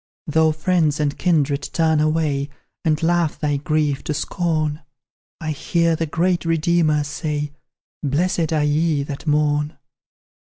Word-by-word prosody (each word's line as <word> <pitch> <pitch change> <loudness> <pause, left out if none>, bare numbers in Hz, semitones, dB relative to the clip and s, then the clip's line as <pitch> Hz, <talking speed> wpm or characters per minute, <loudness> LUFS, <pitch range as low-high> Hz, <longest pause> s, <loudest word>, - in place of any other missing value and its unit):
Though 160 +1 +3
friends 155 -1 +1
and 145 -1 0
kindred 150 -5 +1
turn 160 -2 +2
away, 150 -2 +1 0.3
And 155 0 +1
laugh 170 -2 +1
thy 145 -2 0
grief 150 -1 0
to 150 - -2
scorn; 155 -2 -1 0.6
I 155 -2 -3
hear 170 +3 +1
the 165 0 -2
great 170 +3 +1
Redeemer 165 -2 +2
say, 150 0 -3 0.5
"Blessed 160 +3 0
are 155 -2 +2
ye 150 0 +1
that 145 +2 -7
mourn." 150 0 +1
155 Hz, 130 wpm, -21 LUFS, 150-165 Hz, 0.6 s, Though